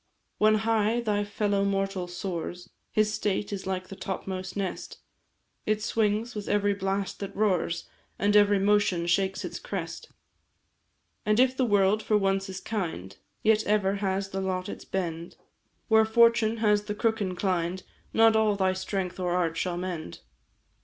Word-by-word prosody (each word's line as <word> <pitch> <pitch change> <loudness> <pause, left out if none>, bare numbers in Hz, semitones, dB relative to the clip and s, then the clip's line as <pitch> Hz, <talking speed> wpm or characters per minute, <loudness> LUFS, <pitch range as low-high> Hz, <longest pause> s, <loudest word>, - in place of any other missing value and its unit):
"When 215 0 +5
high 220 +1 +1
thy 210 -3 0
fellow 205 -1 0
mortal 195 -2 -1
soars, 175 0 -5 0.2
His 215 0 +2
state 205 -1 -1
is 190 -1 -5
like 185 -1 -3
the 195 - -7
topmost 190 0 -5
nest 195 -2 -4 0.7
It 215 0 +1
swings 220 +2 0
with 210 -2 -6
every 205 0 +2
blast 195 0 -2
that 200 -1 -6
roars, 185 -5 0 0.3
And 205 +1 +2
every 205 -1 +6
motion 200 -3 +2
shakes 190 +2 0
its - - -6
crest. - - -6 1.1
"And 215 +2 +2
if 260 0 +4
the 260 - +1
world 205 0 +3
for 215 0 +2
once 195 -1 0
is 190 0 -5
kind, 165 - -4 0.3
Yet 220 0 +4
ever 200 -1 +2
has 195 0 -1
the 195 0 -3
lot 185 -1 -2
its - - -8
bend; 170 -3 -4 0.5
Where 220 -1 +5
fortune 230 0 +4
has 210 -2 +2
the 210 0 -3
crook 220 0 0
inclined, 185 -1 -1 0.3
Not 225 0 +5
all 215 -2 +3
thy 190 -1 +1
strength 190 -1 -3
or 180 -1 0
art 170 -3 0
shall 175 +1 -2
mend. 175 - -5
200 Hz, 160 wpm, -27 LUFS, 185-215 Hz, 1.1 s, every